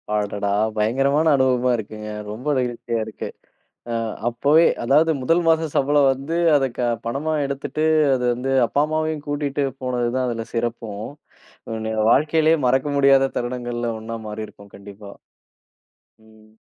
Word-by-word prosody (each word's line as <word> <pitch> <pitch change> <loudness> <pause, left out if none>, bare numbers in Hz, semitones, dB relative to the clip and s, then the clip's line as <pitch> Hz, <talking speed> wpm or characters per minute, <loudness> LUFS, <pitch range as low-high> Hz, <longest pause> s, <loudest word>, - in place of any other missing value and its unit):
அடடா! 105 -1 -1 0.3
பயங்கரமான 135 +8 +2
அனுபவமா 130 -2 +2
இருக்குங்க. 105 0 -7 0.2
ரொம்ப 120 +7 -5
நெகிழ்ச்சியா 120 -2 -2
இருக்கு. 110 - -7 0.6
அ - - -1 0.4
அப்போவே 145 +7 +3 0.2
அதாவது 150 +7 +4
முதல் 165 +7 +2
மாச 160 0 +3
சம்பளம் 140 0 +3
வந்து, 140 +5 -5 0.2
அதை 135 -2 +3
க - - -2 0.2
பணமா 140 +7 -2
எடுத்துட்டு 140 +3 -3 0.3
அது 125 -1 -2
வந்து, 125 +3 -3 0.2
அப்பா 140 - +1
அம்மாவையும் 155 -1 -2
கூட்டிட்டு 145 -1 -1 0.2
போனது 125 -2 -1
தான் 130 -1 0
அதில 115 -1 -4
சிறப்பும். 115 -3 -3 0.6
உங்களுடைய 110 0 -4 0.2
வாழ்க்கையிலே 160 +3 +3
மறக்க 130 +3 +1
முடியாத 135 -1 +4
தருணங்கள்ல 120 -1 -3
ஒண்ணா 115 +1 -6
மாறியிருக்கும் 105 -1 -8
கண்டிப்பா. 100 0 -12 1.1
ம். 110 0 -22
125 Hz, 130 wpm, -22 LUFS, 110-145 Hz, 1.1 s, அதாவது